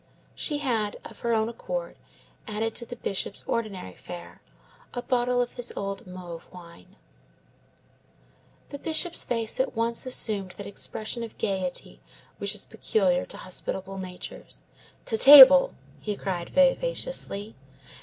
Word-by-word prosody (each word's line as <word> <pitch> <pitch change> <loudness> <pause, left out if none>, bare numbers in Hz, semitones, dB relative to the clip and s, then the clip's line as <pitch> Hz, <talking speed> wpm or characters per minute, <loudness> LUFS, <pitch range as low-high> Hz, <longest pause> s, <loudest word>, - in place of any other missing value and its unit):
She 295 - -2
had, 230 -7 -1
of - - -11
her 235 - -2
own 220 -1 +1
accord, - - -5 0.5
added 220 +1 -2
to 235 - -2
the 245 - -7
Bishop's 200 -3 -3
ordinary 200 - -4
fare 85 0 -11 0.5
a 245 - -4
bottle 245 -1 +1
of 245 - -9
his 245 -1 -3
old 195 -1 -5
Mauves 175 -2 -9
wine. 170 - -15 1.7
The 285 - -7
Bishop's 325 +2 +2
face 230 -1 0
at 260 -1 0
once 230 +3 0
assumed 205 -7 +3
that 200 - -7
expression 220 +3 -2
of 230 -1 -8
gayety 190 -3 -3 0.4
which - - 0
is - - -2
peculiar - - 0
to - - -8
hospitable 190 0 -2
natures. 180 -1 -8 0.4
"To 225 - -1
table!" 275 +1 +10 0.2
he 210 -1 -4
cried 180 -3 -4
vivaciously. 275 - 0
225 Hz, 135 wpm, -26 LUFS, 195-255 Hz, 1.7 s, table